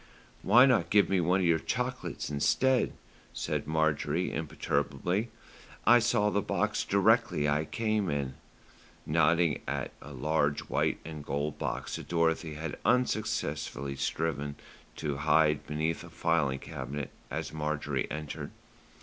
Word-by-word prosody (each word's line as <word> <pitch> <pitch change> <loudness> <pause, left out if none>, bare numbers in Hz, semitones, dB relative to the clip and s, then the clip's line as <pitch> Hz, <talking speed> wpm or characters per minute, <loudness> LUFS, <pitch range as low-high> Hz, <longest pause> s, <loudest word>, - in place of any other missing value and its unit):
"Why 125 +2 +7
not 130 -3 +3
give 105 -1 +4
me 95 -2 +2
one 90 +3 +2
of - - +1
the - - -16
chocolates - - -3
instead," 125 - +2 0.4
said - - -2
Marjorie 80 +3 0
imperturbably. 90 - -1 0.6
"I 120 +1 +8
saw 105 -3 +2
the 100 - +1
box - - 0
directly 75 0 +3
I 75 +2 +1
came 110 -1 0
in," 70 -3 -2 0.7
nodding 80 +1 +3
at - - -2
a 70 - -10
large 75 +2 0
white - - 0
and 80 -2 -7
gold 70 +2 -3
box - - -3
that - - -9
Dorothy 80 -2 +1
had 80 0 -5
unsuccessfully 110 - 0
striven 70 +1 -2 0.4
to 75 -3 -3
hide 75 0 +3
beneath 80 +3 -1
a 85 - -10
filing 80 -4 +1
cabinet 65 +1 -6 0.2
as - - -4
Marjorie 75 -2 -2
entered. 75 0 -5
80 Hz, 130 wpm, -30 LUFS, 75-90 Hz, 0.7 s, I